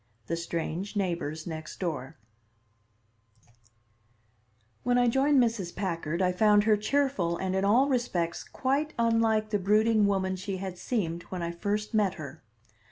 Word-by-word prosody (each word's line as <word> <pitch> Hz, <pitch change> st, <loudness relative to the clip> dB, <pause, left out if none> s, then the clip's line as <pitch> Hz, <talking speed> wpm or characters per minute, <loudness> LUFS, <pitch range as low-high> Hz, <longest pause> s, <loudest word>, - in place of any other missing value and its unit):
THE 165 Hz, -, -2 dB
STRANGE 170 Hz, +4 st, -4 dB
NEIGHBORS 170 Hz, -5 st, -2 dB
NEXT 160 Hz, -2 st, -7 dB
DOOR 150 Hz, -8 st, -4 dB, 2.6 s
When 245 Hz, 0 st, +2 dB
I 245 Hz, 0 st, +4 dB
joined 270 Hz, +4 st, +3 dB
Mrs. 225 Hz, -8 st, 0 dB
Packard 170 Hz, -2 st, -2 dB
I 180 Hz, -, +3 dB
found 205 Hz, +2 st, +4 dB
her 215 Hz, 0 st, +4 dB
cheerful 210 Hz, -6 st, 0 dB
and 190 Hz, 0 st, -2 dB
in 190 Hz, -, +1 dB
all 235 Hz, +7 st, +4 dB
respects 215 Hz, -11 st, -1 dB
quite 280 Hz, +3 st, -1 dB
unlike 225 Hz, -2 st, +2 dB
the 205 Hz, -, +1 dB
brooding 215 Hz, +2 st, +3 dB
woman 190 Hz, -1 st, 0 dB
she 190 Hz, +1 st, -4 dB
had 185 Hz, -1 st, -6 dB
seemed 170 Hz, -8 st, -2 dB
when 180 Hz, -2 st, -4 dB
I 170 Hz, -, -2 dB
first 210 Hz, +5 st, -3 dB
met 205 Hz, -4 st, +2 dB
her. 155 Hz, -3 st, -9 dB
200 Hz, 145 wpm, -28 LUFS, 170-225 Hz, 2.6 s, I